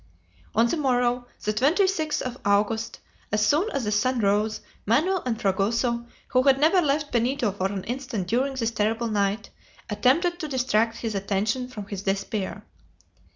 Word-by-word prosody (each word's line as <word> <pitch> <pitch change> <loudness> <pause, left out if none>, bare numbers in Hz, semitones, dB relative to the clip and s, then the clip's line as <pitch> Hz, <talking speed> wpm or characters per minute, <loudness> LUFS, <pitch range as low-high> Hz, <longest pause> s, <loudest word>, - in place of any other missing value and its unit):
On 230 +2 +5
the 235 - 0
morrow, 245 -3 +1 0.2
the 215 - 0
26th 315 - +1
of 250 0 -5
August, 210 +2 0 0.3
as 210 0 +2
soon 320 - +2
as 275 - -2
the 210 - -1
sun 245 +4 +1
rose, 210 +1 +1 0.3
Manoel 330 - +2
and 225 -3 -1
Fragoso, 230 +4 0 0.2
who 255 - +3
had 270 0 +4
never 325 +5 +4
left 295 -1 0
Benito 240 -1 +1
for 190 -1 -1
an 195 -1 -4
instant 245 -5 -4
during 265 +6 0
this 230 -3 -1
terrible 225 +1 0
night, 205 0 -1 0.4
attempted 310 - +2
to 315 - -3
distract 235 -4 +1
his 225 -2 -3
attention 205 +5 -1
from 220 -5 -8
his 200 -1 -6
despair. 195 0 -3
235 Hz, 160 wpm, -25 LUFS, 210-270 Hz, 0.4 s, On